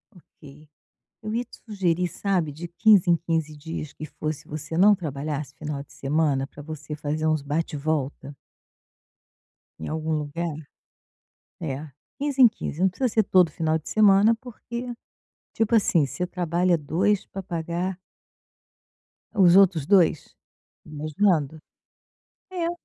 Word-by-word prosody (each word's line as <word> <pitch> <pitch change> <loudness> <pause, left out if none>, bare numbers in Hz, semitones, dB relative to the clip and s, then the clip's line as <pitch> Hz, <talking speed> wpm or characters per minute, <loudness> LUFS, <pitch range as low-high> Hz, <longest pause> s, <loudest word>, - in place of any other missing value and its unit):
Ok, 150 -3 -17 0.5
eu 215 0 -4
ia 240 - 0
te 245 - -16
sugerir, 180 -5 0
sabe, 180 -4 -1
de 170 +4 -7
15 195 0 +4
em 170 - +5
15 160 -2 -2
dias 155 0 -6
que 155 - -8
fosse, 155 0 -5
você 155 +2 -5
não 205 +3 +6
trabalhasse 150 -4 -4
final 145 -1 -5
de - - -24
semana 140 -1 0
pra 145 - -12
você 155 0 -7
fazer 150 +1 -2
uns 155 -1 +1
bate-volta 145 -1 -2 1.4
em 80 - -7
algum 160 0 -2
lugar. 155 +2 -3 1.1
É, 140 +3 -4 0.3
15 280 -2 +1
em 245 - +10
15, 170 -6 -6
não 190 - +5
precisa 250 +8 -1
ser 220 0 +2
todo 180 -3 +4
final 160 0 0
de 155 - -11
semana, 210 +1 +5
porque 245 0 -7 0.6
tipo 225 +1 0
assim, 170 -9 +3
você 180 +6 -3
trabalha 175 0 +1
2 180 +7 0
pra 195 - -7
pagar 175 +1 -3 1.4
os 185 -5 +6
outros 185 -7 +5
2. 175 -5 +3 0.5
Imaginando. 155 0 0 0.9
É. 345 -2 -1
165 Hz, 135 wpm, -25 LUFS, 150-195 Hz, 1.4 s, em